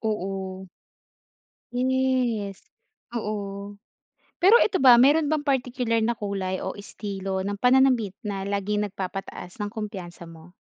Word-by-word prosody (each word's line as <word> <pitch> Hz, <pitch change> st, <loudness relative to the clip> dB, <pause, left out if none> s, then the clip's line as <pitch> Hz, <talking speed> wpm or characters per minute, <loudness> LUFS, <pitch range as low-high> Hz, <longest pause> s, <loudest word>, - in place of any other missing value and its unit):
Oo. 190 Hz, -3 st, -3 dB, 1.1 s
Yes. 250 Hz, -5 st, 0 dB, 0.6 s
Oo. 205 Hz, -2 st, -5 dB, 0.6 s
Pero 385 Hz, +5 st, +6 dB
eto 385 Hz, -, +2 dB
ba 255 Hz, -2 st, +8 dB
meron 295 Hz, +4 st, +5 dB
bang 305 Hz, -2 st, +1 dB
particular 250 Hz, -3 st, 0 dB
na 235 Hz, -, +1 dB
kulay 195 Hz, -3 st, -3 dB
o 190 Hz, -, -4 dB
estilo 195 Hz, -2 st, -5 dB
ng 200 Hz, +1 st, -3 dB
pananamit 250 Hz, -4 st, +3 dB
na 200 Hz, -3 st, -4 dB
laging 205 Hz, +1 st, -1 dB
nag-papataas 195 Hz, -2 st, -7 dB
ng 205 Hz, 0 st, -3 dB
kumpiyansa 185 Hz, -6 st, -7 dB
mo? 165 Hz, +1 st, -14 dB
205 Hz, 120 wpm, -25 LUFS, 195-250 Hz, 1.1 s, ba